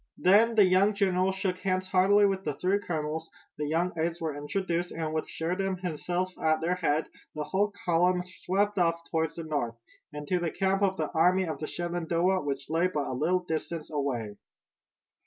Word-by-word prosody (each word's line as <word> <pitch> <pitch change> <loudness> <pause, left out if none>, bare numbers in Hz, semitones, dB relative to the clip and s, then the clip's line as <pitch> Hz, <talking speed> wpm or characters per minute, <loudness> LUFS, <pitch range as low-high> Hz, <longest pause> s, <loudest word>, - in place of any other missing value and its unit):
Then 220 +5 +5
the 210 -2 +7
young 190 +3 +3
general 190 -2 +2
shook 190 -1 -2
hands 185 -1 -1
heartily 195 +3 +5
with 195 -1 0
the 150 -2 -2
three 190 +3 +1
colonels, 160 -3 -3 0.3
the 150 - -1
young 170 +4 +1
aides 165 +1 -1
were 160 -3 -3
introduced, 175 +4 -2
and 160 -1 -3
with 155 - -2
Sheridan 185 +3 -2
himself 180 +1 -2
at 155 0 +3
their 170 +2 0
head 160 -3 0 0.3
the 150 - -2
whole 200 +6 0
column 180 +1 +3
swept 190 +2 -1
off 170 -1 +2
toward 160 -1 0
the 165 - -5
north, 145 -7 -2 0.4
and 150 -1 -7
to 180 +2 +1
the 170 -1 -1
camp 195 +3 0
of 190 -1 +2
the 155 - -2
Army 180 +3 +3
of 160 -3 -4
the 155 - -4
Shenandoah 175 +1 0
which 140 -2 -4
lay 165 +3 +2
but 150 -6 -2
a - - -3
little 170 +8 +1
distance 160 -1 -4
away. 125 -8 -2
175 Hz, 190 wpm, -28 LUFS, 155-185 Hz, 0.4 s, the